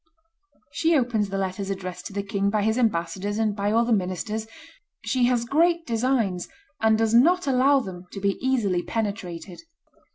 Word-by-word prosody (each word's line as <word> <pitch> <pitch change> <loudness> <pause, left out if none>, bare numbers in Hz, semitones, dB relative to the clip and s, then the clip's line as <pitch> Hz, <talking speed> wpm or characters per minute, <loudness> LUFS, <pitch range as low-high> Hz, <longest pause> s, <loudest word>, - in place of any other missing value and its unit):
She 330 -1 +2
opens 235 -6 0
the 195 - -3
letters 195 +1 -3
addressed 185 -2 -5
to - - -11
the 200 0 -2
king 200 0 -1
by 210 0 0
his 220 +1 +1
ambassadors 200 -2 -1
and 220 -2 0
by 205 0 -1
all 230 +2 +3
the 235 - +2
ministers.... 210 +3 -2 0.6
She 255 -2 +2
has 240 -1 +1
great 335 +5 +2
designs, 230 - 0 0.3
and 220 0 +3
does 225 0 +1
not 335 +10 +5
allow 270 +1 +4
them 180 -4 -9
to 195 - -6
be 200 0 0
easily 230 -9 +1
penetrated. 190 -5 -4
215 Hz, 170 wpm, -25 LUFS, 195-245 Hz, 0.6 s, not